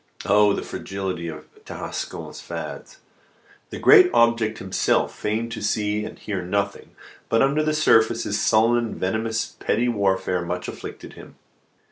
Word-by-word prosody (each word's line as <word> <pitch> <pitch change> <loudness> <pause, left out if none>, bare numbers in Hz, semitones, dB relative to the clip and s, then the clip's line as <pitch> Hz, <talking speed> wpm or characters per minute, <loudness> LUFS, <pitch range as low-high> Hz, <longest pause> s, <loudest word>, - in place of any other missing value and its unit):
Oh, 105 0 +4
the - - -3
fragility 95 -3 -5
of 80 -1 -8 0.2
Tarascon's - - -6
fads! - - -7 0.7
The - - -7
great 380 -4 +7
object 115 -2 +3
himself 95 -1 0
feigned 115 +2 -2
to - - -5
see 105 0 -1
and 110 - -9
hear 100 -3 -4
nothing; 100 +3 -3 0.3
but, 115 - +3
under 140 +3 +2
the 155 0 0
surface, 115 -6 +3
this 100 - -2
sullen 115 +2 +4
and 115 - -5
venomous 110 +4 -2
petty 120 +2 0
warfare 95 -4 0
much 90 +1 -4
afflicted - - -8
him. - - -13
110 Hz, 145 wpm, -23 LUFS, 95-115 Hz, 0.7 s, great